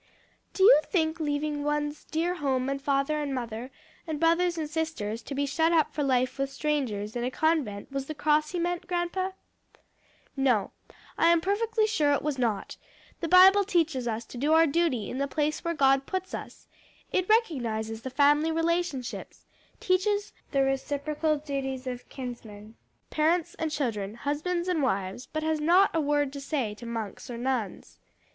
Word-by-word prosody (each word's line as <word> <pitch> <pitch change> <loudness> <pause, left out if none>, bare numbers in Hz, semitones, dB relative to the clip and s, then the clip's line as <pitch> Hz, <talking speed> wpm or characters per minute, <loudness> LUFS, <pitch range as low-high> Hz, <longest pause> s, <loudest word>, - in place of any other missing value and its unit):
"Do 380 - +2
you 405 -6 +8
think 320 -3 0
leaving 295 -1 -1
one's 295 0 -2
dear 335 +3 -1
home 270 -5 -1
and 275 0 -3
father 280 +2 0
and 280 -2 -2
mother, 240 0 -5 0.4
and 310 -2 -3
brothers 340 +2 +2
and 315 -2 -2
sisters 300 -9 -3
to 275 - -7
be 285 +1 0
shut 320 +4 +1
up 320 -3 +2
for 300 - -2
life 255 -1 +1
with 275 0 0
strangers, 255 -8 -2
in 240 - -2
a 250 - 0
convent, 275 -8 -1
was 275 0 -3
the 310 - -5
cross 300 0 +2
he 360 - -4
meant, 350 0 -2
grandpa?" 360 +1 -1 1.1
"No, 250 -7 +1 0.5
I 330 - +5
am 340 0 +5
perfectly 435 +5 +1
sure 310 -10 +2
it 285 - 0
was 290 -3 -2
not; 225 -5 -1 0.4
the 335 - -2
Bible 380 +4 +7
teaches 325 -10 0
us 225 0 -3
to 240 - -9
do 295 +4 +2
our 325 +1 +6
duty 290 -8 0
in 255 - -5
the 280 - 0
place 300 +1 -1
where 335 0 -1
God 270 -1 +3
puts 375 0 -4
us; - - -8 0.4
it 370 +1 0
recognizes 230 - 0
the 260 - -5
family 295 +4 +3
relationships; 330 -5 -2 0.3
teaches 405 +3 0 0.2
the 275 -1 +2
reciprocal 290 +3 -1
duties 270 -3 -4
of 250 -1 -6
kinsmen, 225 -5 -8 0.4
parents 320 +2 +1
and 320 - -1
children, 220 -9 -2
husbands 310 +7 -2
and 355 -4 +1
wives, 195 -1 -2
but 310 0 -2
has 315 -1 0
not 355 +6 +5
a 325 - +2
word 290 -1 +1
to 280 - -6
say 270 -7 -2
to 235 +3 -10
monks 225 0 -5
or 240 - -5
nuns. 245 -4 -3
295 Hz, 175 wpm, -28 LUFS, 255-330 Hz, 1.1 s, you